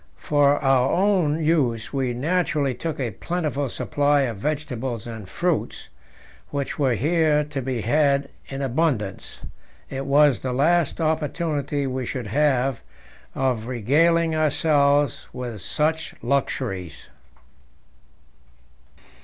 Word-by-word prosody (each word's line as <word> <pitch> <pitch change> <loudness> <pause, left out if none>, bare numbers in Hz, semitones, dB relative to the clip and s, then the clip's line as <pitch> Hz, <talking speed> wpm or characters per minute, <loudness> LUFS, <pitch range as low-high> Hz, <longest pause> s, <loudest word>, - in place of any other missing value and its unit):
For 145 -1 +3
our 135 -1 +3
own 175 -6 +2
use 130 -9 +1
we 135 -3 0
naturally 150 0 0
took 160 +4 -5
a 125 -4 -1
plentiful 150 - -2
supply 145 +2 +1
of 120 -6 -2
vegetables 130 -3 -3
and 110 -5 -8
fruits, 175 - -2 0.6
which 140 0 -4
were 130 -4 +2
here 155 +3 +2
to 145 -2 -5
be 125 -2 -2
had 140 +3 +2 0.2
in 135 0 -5
abundance; 130 - -2 0.5
it 135 +1 -4
was 140 -4 +4
the 130 -1 -3
last 165 +5 +2
opportunity 150 -2 -1
we 130 -2 -3
should 125 -4 -4
have 135 +1 +1 0.5
of 125 -4 -1
regaling 160 +8 +2
ourselves 145 -2 +2
with 120 -5 -6
such 160 - -1
luxuries. 120 - -2
140 Hz, 110 wpm, -23 LUFS, 125-155 Hz, 0.6 s, was